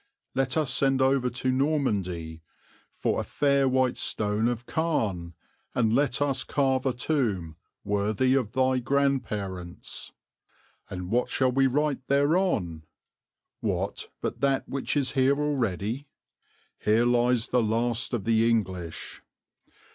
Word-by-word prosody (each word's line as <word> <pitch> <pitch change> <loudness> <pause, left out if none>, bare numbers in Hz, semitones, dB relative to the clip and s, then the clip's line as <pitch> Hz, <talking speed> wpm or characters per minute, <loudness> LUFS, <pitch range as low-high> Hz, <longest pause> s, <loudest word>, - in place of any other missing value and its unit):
"Let 135 +2 0
us 145 -5 +1
send 135 0 +2
over 130 -1 +3
to 125 +1 -1
Normandy 100 - -1 0.5
for - - 0
a - - -1
fair 140 -2 +2
white 130 -1 +1
stone 105 +1 +1
of 120 0 -2
Caen, 105 - -1 0.4
and 115 -2 +2
let 140 +1 +2
us 135 -2 0
carve 135 -2 +1
a 130 - +1
tomb 115 - -1 0.3
worthy 105 +5 +1
of 125 -5 0
thy 130 0 +2
grand 140 +1 +1
parents." 95 -4 -6 0.8
"And 90 0 -6
what 125 +2 +1
shall 130 -1 +2
we 135 +1 +3
write 140 0 -1
thereon?" 140 - +1 0.8
"What - - -2
but - - -4
that 135 -1 +1
which 140 +2 -2
is 140 -2 +1
there 135 0 +3
already? 125 -3 -1 0.7
'Here 110 +3 +3
lies 120 -1 +2
the 125 - +3
last 115 +2 0
of 110 - -3
the 115 0 +3
English.'" 95 -7 -2
125 Hz, 130 wpm, -27 LUFS, 105-135 Hz, 0.8 s, over